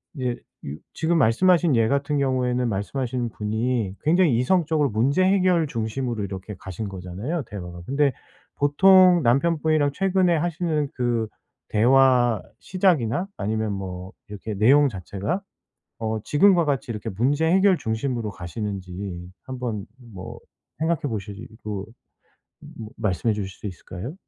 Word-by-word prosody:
이제 125 -4 -2 0.3
유 70 +1 -5 0.2
지금 165 +1 +1
말씀하신 165 +6 +4
예 115 -1 +3
같은 140 +2 0
경우에는 125 -2 0
말씀하신 120 +4 -2
분이 110 -1 -2
굉장히 160 -5 +3
이성적으로 155 +1 +2
문제 135 - +2
해결 185 -3 +3
중심으로 115 -1 -3
이렇게 95 +1 -6
가신 95 +3 -6
거잖아요, 95 - -4
대화가. 90 -4 -7
근데 140 0 +2 0.5
보통 180 +4 +6
남편분이랑 155 +3 +2
최근에 185 -1 +2
하시는 160 -2 -1
그 120 -3 0 0.4
대화 120 0 +4 0.2
시작이나 180 - +1
아니면 110 +1 -1
뭐 95 -1 -6 0.2
이렇게 105 +1 -6
내용 140 +8 +5
자체가 100 - -4 0.6
어 110 -1 -2
지금과 175 +2 +4
같이 140 -4 -1
이렇게 110 0 -5
문제 135 +10 +1
해결 190 +1 +4
중심으로 110 -2 -2
가시는지 95 -1 -6 0.2
한번 125 -6 -4 0.3
뭐 95 -1 -8 0.4
생각해 160 0 0
보시고 105 -3 -5 1.1
말씀해 105 +3 0
주실 100 -2 -4
수 - - -7
있을까요? 95 - -7
125 Hz, 305 characters per minute, -24 LUFS, 105-155 Hz, 1.1 s, 보통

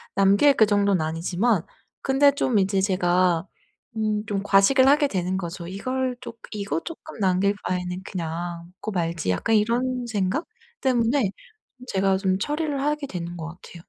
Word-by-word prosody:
남길 200 +9 +5
그 220 - +6
정도는 200 -4 +2
아니지만 175 +5 0 0.4
근데 280 +1 +4
좀 255 -6 +1
이제 190 0 +1
제가 180 -2 +2 0.5
음 215 -1 0
좀 200 -1 -2
과식을 235 +7 +5
하게 290 +1 +5
되는 185 -4 -2
거죠. 170 -1 -5
'이걸 255 +6 -2
쪼 240 - -8 0.2
이거 200 -6 -2
쪼끔 320 -6 -9
남길 195 +1 +2
바에는 180 0 -3
그냥 170 -1 -5
먹고 215 - -6
말지.' 170 - -2
약간 220 - +1
이런 245 +3 +1
생각? 210 - -1 0.4
때문에 240 -4 +2 0.6
제가 195 -2 +1
좀 190 -1 +1
처리를 295 +1 -2
하게 295 -1 -1
되는 175 -3 -5
것 160 0 -5
같아요. 175 0 -12
200 Hz, 300 characters per minute, -24 LUFS, 180-245 Hz, 0.6 s, 그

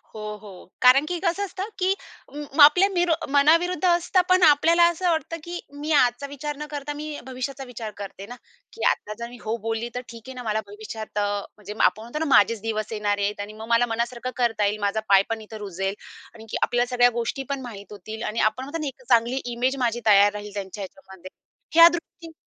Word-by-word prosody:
हो, 215 - -7 0.2
हो. 190 -2 -13
कारण 260 +4 +6
की 350 +2 -3
कसं 385 +3 0
असतं 390 +2 -6
की 375 +1 +2 0.4
म 295 0 -7
आपल्या 360 +7 +7
मीरो 350 -3 +1 0.2
मनाविरुद्ध 330 +6 +3
असतं. 350 +2 +3
पण 370 0 +5
आपल्याला 330 +3 +5
असं 350 +1 -1
वाटतं, 330 0 -1
की 345 +1 -6 0.2
मी 305 +2 -3
आजचा 255 -1 +3
विचार 290 +1 -5
न 300 - -5
करता 290 0 -4
मी 300 0 -6
भविष्याचा 265 +1 -5
विचार 230 -4 -7
करते 200 -1 -8
ना, 245 +4 -9 0.4
की 460 - -7
"आता 210 - -3
जर 235 - -5
मी 245 - -12
हो 220 +2 -1
बोलली 225 +1 -2
तर 250 - -2
ठीक 230 -1 -10
आहे 260 - -7
ना 250 - -7
मला 220 -1 -1
भविष्यात" 215 +1 -8
अ, 205 - +1 0.3
म्हणजे 210 0 -8
आपण 190 +4 +3
म्हणतो 240 +7 -6
ना 320 - -1
"माझेच 210 +1 +4
दिवस 215 -1 -3
येणारेत. 205 -1 -1
आणि 205 +1 -6
मग 220 +1 -9
मला 235 +1 +4
मनासारखं 235 +2 -3
करता 230 -4 +1
येईल. 210 +1 -1
माझा 205 +1 0
पाय 195 0 +6
पण 225 -1 -3
इथं 215 0 -10
रुजेल. 195 -1 -3 0.4
आणखी 225 -1 -6
आपल्याला 245 0 +2
सगळ्या 245 0 +6
गोष्टी 235 +3 -3
पण 275 -1 -2
माहित 210 -5 -9
होतील" 215 +3 -8
आणि 215 +2 -3
आपण 215 +4 +1
म्हणतो 290 +5 -5
ना, 295 - -2
एक 260 -1 -8
चांगली 240 +2 +3
इमेज 245 +2 -1
माझी 235 0 -1
तयार 205 -1 +6
राहील 210 0 -7
त्यांच्या 200 0 -6
ह्याच्यामध्ये. 190 -5 -12 0.5
ह्या 335 0 +10
दृष्टीने 335 -1 -8
240 Hz, 210 wpm, -24 LUFS, 215-295 Hz, 0.5 s, ह्या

